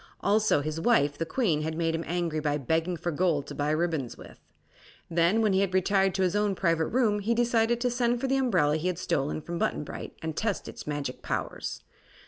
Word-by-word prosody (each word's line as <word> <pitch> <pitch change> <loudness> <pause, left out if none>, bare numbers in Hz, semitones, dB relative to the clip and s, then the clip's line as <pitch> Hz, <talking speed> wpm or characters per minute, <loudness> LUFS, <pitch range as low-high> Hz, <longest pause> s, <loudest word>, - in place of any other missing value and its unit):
Also 205 -6 +3
his 155 +2 -3
wife, 145 -10 +3
the 165 - -3
Queen, 165 - +1
had 160 +1 -3
made 165 -1 0
him 165 0 -2
angry 170 -2 -1
by 150 -1 0
begging 160 +5 0
for 175 +2 -2
gold 160 -3 +1
to - - -8
buy 145 +1 -1
ribbons 155 -5 -1
with. - - -13 0.7
Then, 170 +7 +3
when 210 -3 +3
he 190 - +3
had 195 -1 0
retired 190 0 +2
to 190 - +1
his 185 +1 +1
own 205 -1 +1
private 165 -3 +1
room, 220 -4 +2
he 225 +3 0
decided 235 0 +2
to 250 0 +1
send 240 0 +1
for 270 - -2
the 270 0 +2
umbrella 160 - +2
he 165 +3 -2
had 180 -2 -1
stolen 150 -4 -1
from 170 0 -4
Button - - 0
Bright, - - -8
and 160 -1 -3
test 210 0 -2
its - - -9
magic 145 -3 -4
powers. - - -4
175 Hz, 220 wpm, -28 LUFS, 155-210 Hz, 0.7 s, Also